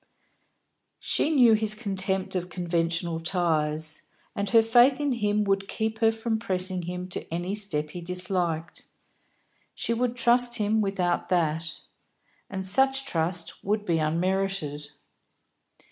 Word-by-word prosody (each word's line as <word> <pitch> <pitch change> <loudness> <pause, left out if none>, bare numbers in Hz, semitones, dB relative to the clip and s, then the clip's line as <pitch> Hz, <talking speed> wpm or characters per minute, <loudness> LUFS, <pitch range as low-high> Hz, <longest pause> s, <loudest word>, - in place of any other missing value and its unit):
She - - 0
knew 250 -7 +6
his 215 -1 +2
contempt 195 -3 -2
of 180 -1 -3
conventional 170 -1 -1
ties, 160 -3 -1 0.3
and 200 0 -2
her 225 +2 +6
faith 245 +4 +5
in 290 -1 0
him 210 -3 +1
would 195 -1 0
keep 220 +1 -3
her 225 0 +4
from 225 0 -2
pressing 185 -3 -2
him 180 +1 -5
to 180 - -7
any 175 +3 -2
step 155 -8 -1
he 175 - -7
disliked; 180 -2 -2 0.9
she 235 - -1
would 245 +1 -1
trust 245 0 +4
him 215 -1 +1
without 190 -3 -1
that. 165 -2 -1 0.7
And 190 -1 -4
such 270 +6 +2
trust 170 -5 -2
would 210 +1 -1
be 170 -3 +1
unmerited. 165 -2 -1
190 Hz, 130 wpm, -26 LUFS, 170-220 Hz, 0.9 s, knew